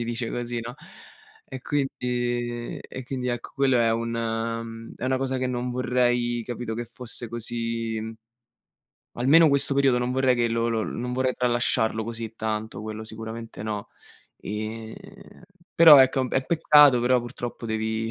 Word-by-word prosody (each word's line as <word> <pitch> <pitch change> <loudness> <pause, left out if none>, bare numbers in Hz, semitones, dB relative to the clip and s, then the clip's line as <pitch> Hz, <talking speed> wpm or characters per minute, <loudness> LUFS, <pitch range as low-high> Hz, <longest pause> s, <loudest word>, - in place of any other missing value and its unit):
si - - -2
dice 120 0 -3
così, 120 -1 -3
no? 120 +2 -7 0.7
E 130 - -7
quindi 120 -4 -2
e 130 - -9
quindi, 125 -1 -4
ecco, 120 -1 -4
quello 135 -2 +3
è 115 -1 +3
un 115 +1 -2
mhmm, 115 0 -4
è - - -6
una 130 - +1
cosa 130 -1 -2
che 130 - -1
non 125 0 -2
vorrei, 120 -1 +1
capito, 120 -1 -5
che 120 - -4
fosse 120 0 -3
così 115 -1 -3 1.1
almeno 150 +7 +5
questo 140 0 +2
periodo 135 -3 +3
non 125 0 -1
vorrei 130 -1 +2
che 120 -1 +1
lo 115 0 0
lo 110 -1 0
non 125 +1 -4
vorrei 130 0 0
tralasciarlo 120 -2 +1
così 115 -1 -6
tanto, 110 0 -4
quello 110 0 -6
sicuramente 110 0 -8
no. 105 -2 -4 0.5
Ehm, 110 +2 -5 0.8
però, 160 -4 +10
ecco, 130 0 +5
è - - +1
un 130 - -2
p - - -20
è - - +4
un 130 - -7
peccato, 150 -5 +6
però 125 +1 +3
purtroppo 120 -1 -6
devi 110 0 -2
120 Hz, 170 wpm, -25 LUFS, 115-125 Hz, 1.1 s, però